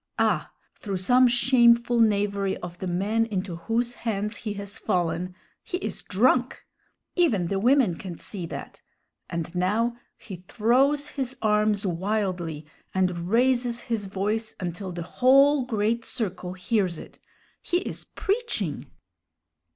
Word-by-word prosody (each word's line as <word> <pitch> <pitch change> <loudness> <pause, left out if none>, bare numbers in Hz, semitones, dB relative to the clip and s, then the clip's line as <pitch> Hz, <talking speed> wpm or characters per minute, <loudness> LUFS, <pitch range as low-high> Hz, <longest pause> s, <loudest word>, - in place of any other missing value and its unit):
Ah, - - +1 0.3
through 195 -3 -3
some 250 +8 +5
shameful 240 -1 +4
knavery 200 -3 +2
of 175 0 -8
the 190 - -4
men 200 +6 +1
into 190 -5 -3
whose 230 +7 -1
hands 210 -1 -2
he 210 -2 -4
has 200 0 -7
fallen, 180 -2 -1 0.3
he 360 - -4
is - - -4
drunk! 250 +5 +1 0.5
Even 220 - +2
the 195 - 0
women 245 -3 +4
can 170 0 -7
see 185 -5 -5
that; - - -8 0.5
and 170 0 -4
now 210 +7 +1 0.2
he 190 -5 -9
throws 270 +7 +2
his 265 -2 -4
arms 210 -1 +2
wildly 180 -4 -2 0.3
and 180 -2 0
raises 240 +1 +2
his 225 -5 -3
voice 210 +3 -2
until 185 +1 -4
the 175 -1 -5
whole 270 - +4
great 225 0 0
circle 185 -7 -3
hears 185 -2 0
it. - - -12 0.4
He 350 - 0
is - - -5
preaching! 390 - -2
210 Hz, 135 wpm, -26 LUFS, 185-240 Hz, 0.5 s, some